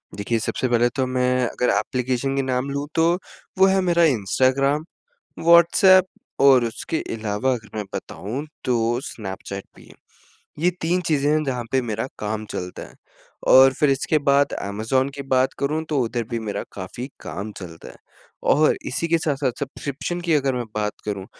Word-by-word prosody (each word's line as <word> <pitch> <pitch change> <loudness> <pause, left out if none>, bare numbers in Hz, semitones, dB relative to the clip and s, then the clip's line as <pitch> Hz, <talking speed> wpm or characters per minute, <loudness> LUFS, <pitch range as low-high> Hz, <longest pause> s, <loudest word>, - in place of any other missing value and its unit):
देखिए, 110 +3 -1
सबसे 130 +4 -1
पहले 120 0 +3
तो 130 -1 +1
मैं 125 0 +1
अगर 125 - -1
ऐप्लीकेशन 130 +1 -1
के 135 - +1
नाम 130 0 -1
लूँ, 140 +1 -3
तो 165 +1 +4 0.4
वो 190 - +7
है 195 0 +3
मेरा 170 -2 +3
इंस्टाग्राम, 135 +3 +2 0.6
व्हाट्सऐप, 170 +2 +6 0.3
और 135 -3 +6
उसके 115 +7 -3 0.2
अलावा 110 +4 -1
अगर 110 -3 -7
मैं 105 - -2
बताऊँ, 125 +9 -5 0.2
तो 120 -1 +1
स्नैपचैट 100 -3 -7
भी - - -16
है। - - -16 0.7
ये 180 - +5
तीन 175 +3 +1
चीज़ें 145 -2 +1
हैं 155 0 +2
जहाँ 125 -3 -2
पे 130 -1 +2
मेरा 110 0 -3
काम 110 +1 -3
चलता 90 0 -6
है, - - -18 0.5
और 130 0 +8
फिर 150 - +4
इसके 135 +3 +1
बाद 140 +1 +3
अमेज़न 110 +7 -1
की 140 - -5
बात 130 +1 +2
करूँ, 155 +3 -1
तो 150 -3 +1
उधर 120 0 -2
भी 120 -1 -2
मेरा 110 -2 -4
काफ़ी 100 +7 -6
काम 100 +4 -6
चलता 85 -3 -10
है। - - -13 0.6
और 155 +1 +4
इसी 165 - -1
के 165 0 +3
साथ-साथ 145 -4 -1
सब्सक्रिप्शन 140 +5 -4
की 170 -2 0
अगर 140 -2 +2
मैं 125 - -2
बात 105 -1 0
करूँ, 100 -2 -4
130 Hz, 175 wpm, -22 LUFS, 115-145 Hz, 0.7 s, और